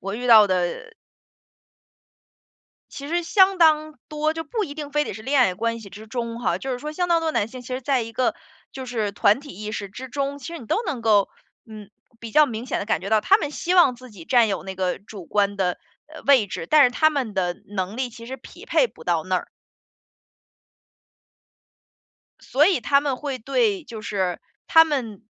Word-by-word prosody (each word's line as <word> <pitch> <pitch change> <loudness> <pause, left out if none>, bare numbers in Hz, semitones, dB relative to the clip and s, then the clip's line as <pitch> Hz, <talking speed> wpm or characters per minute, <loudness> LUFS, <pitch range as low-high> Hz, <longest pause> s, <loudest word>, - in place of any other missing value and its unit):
我 195 +1 -5
遇 250 +2 -4
到 220 -3 +8
的 185 - -2 2.0
其 280 - -8
实 345 +2 0
相 380 +2 +4
当 310 -3 +3
多， 305 +1 -1
就 325 0 -5
不 430 +6 -2
一 290 -5 -8
定 295 -2 -7
非 295 +1 +1
得 - - -5
是 215 - -9
恋 270 +2 +2
爱 185 -7 +3
关 230 +4 -2
系 200 -3 -12
之 215 +3 -11
中 235 0 -4
哈， 180 -6 0
就 265 +4 -4
是 250 - -3
说 300 +3 -6
相 355 +3 -1
当 335 -1 +3
多 325 -1 -1
的 - - 0
男 205 - 0
性 255 +2 -10
其 245 - -12
实 255 +1 -3
在 270 0 +1
一 230 0 -8
个， 255 +3 0 0.4
就 265 -1 -7
是 220 -5 -2
团 210 +4 +3
体 290 - -12
意 210 +3 -7
识 200 -2 -5
之 260 +5 -8
中， 280 +1 -3
其 275 - -10
实 335 0 -6
你 235 - -12
都 435 - 0
能 290 -7 -3
够， 210 -3 +3 0.4
嗯， 215 -2 -11 0.3
比 230 -1 -8
较 300 +5 +5
明 230 -2 -5
显 255 - -2
地 200 - -5
感 - - 0
觉 200 - -5
到， 220 -1 +4
他 390 - +5
们 305 -8 -4
希 350 +4 -2
望 345 -8 +5
自 255 +1 -14
己 185 -6 -12
占 240 0 +4
有 195 -2 -2
那 190 0 -7
个 185 -1 -2
主 200 -3 -11
观 200 -1 +1
的， 180 -2 0 0.3
呃， 310 +1 -12
位 265 -7 +4
置， 165 - -6
但 305 - +6
是 250 - +4
他 310 +5 +3
们 260 -8 -3
的 180 -2 -1
能 195 +1 -4
力 260 -1 -1
其 230 0 -12
实 260 +2 -6
匹 - - -14
配 - - +3
不 - - -16
到 170 -2 +1
那 185 +2 0
儿。 - - -5 2.9
所 295 +4 +2
以 365 -9 +2
他 280 +4 +3
们 280 -3 -2
会 275 -1 -4
对 390 - 0
就 230 -3 -9
是 190 -5 -2 0.3
他 325 -1 +7
们 245 -10 -3
245 Hz, 240 characters per minute, -23 LUFS, 210-295 Hz, 2.9 s, 到